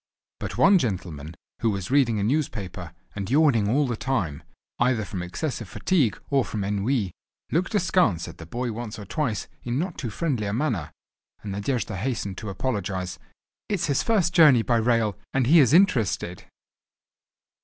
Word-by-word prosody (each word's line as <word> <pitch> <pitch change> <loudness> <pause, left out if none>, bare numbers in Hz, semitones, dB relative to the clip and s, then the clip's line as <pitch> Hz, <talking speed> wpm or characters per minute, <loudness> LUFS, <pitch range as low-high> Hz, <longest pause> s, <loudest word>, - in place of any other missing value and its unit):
But - - -5
one 195 -1 +6
gentleman 85 - -4 0.2
who 115 - +2
was 100 0 -3
reading 130 -6 +3
a 100 - 0
newspaper, 100 - -2 0.2
and 100 -1 -4
yawning 130 -7 +4
all 140 +6 +3
the 120 -3 -2
time, 105 - -2 0.4
either 120 -3 +2
from 90 -1 -5
excessive 110 - -4
fatigue 140 - +1
or 135 -2 +3
from 105 -3 -4
ennui, 100 +1 0 0.4
looked 185 +7 0
askance 170 - +2
at - - -11
the 80 - -9
boy 120 +6 -3
once 115 -1 -6
or 105 - -8
twice 115 - -2
in 120 +1 -2
not 175 +3 -3
too 120 - -3
friendly 125 -3 -1
a 100 - -2
manner, 110 - -1 0.5
and 105 - -5
Nadejda 100 0 -2
hastened 100 -3 -3
to 110 - -6
apologise: 95 - -3 0.5
"It 210 - +1
is 180 - -1
his 140 -2 +1
first 190 -7 +2
journey 150 -9 +7
by 120 0 +2
rail—and 115 +2 0
he 160 +7 +6
is 135 -5 +5
interested." 120 - +2
115 Hz, 165 wpm, -25 LUFS, 100-140 Hz, 0.5 s, journey